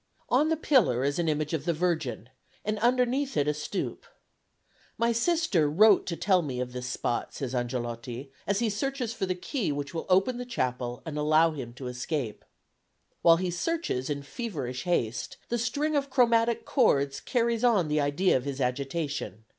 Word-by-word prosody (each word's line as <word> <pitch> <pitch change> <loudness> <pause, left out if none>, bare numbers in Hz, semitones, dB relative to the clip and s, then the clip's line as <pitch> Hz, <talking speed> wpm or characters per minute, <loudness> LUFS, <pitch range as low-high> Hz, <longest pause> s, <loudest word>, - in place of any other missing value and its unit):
On 295 +6 +3
a 320 - +2
pillar 230 - +3
is 140 +4 0
an 165 -2 +1
image 150 +1 -1
of 155 -2 -2
the 170 - +2
Virgin, 155 - -1 0.4
and 210 0 -1
underneath 250 - +1
it 145 0 +2
a 150 - +2
stoup. 150 +6 -4 0.9
"My 235 0 +2
sister 235 - +2
wrote 205 +6 +5
to 170 - -2
tell 185 0 +3
me 135 -6 -4
of 125 -1 -3
this 125 0 -5
spot," 120 -1 -2
says 135 -2 -4
Angelotti, 120 +1 -4 0.2
as 200 0 +2
he 235 - +1
searches 250 +2 -2
for 190 - -2
the 185 - 0
key 185 - -2
which 145 +1 -4
will 165 - -4
open 195 +7 +3
the - - -3
chapel 125 - -2
and 150 -2 -4
allow 155 +2 +4
him 130 -6 -6
to 130 +1 -9
escape. 125 -1 -3 0.8
While 165 -1 +7
he 180 0 -1
searches 175 - -2
in 145 -1 -2
feverish 145 - -5
haste 120 -10 -1
the 240 - 0
string 290 +6 0
of 280 -1 0
chromatic 235 -3 +3
chords 140 - +2
carries 235 - 0
on 215 -9 +4
the 150 0 +1
idea 145 +7 +2
of 130 - 0
his 140 -1 -4
agitation. 135 - -2
165 Hz, 180 wpm, -28 LUFS, -, 0.9 s, While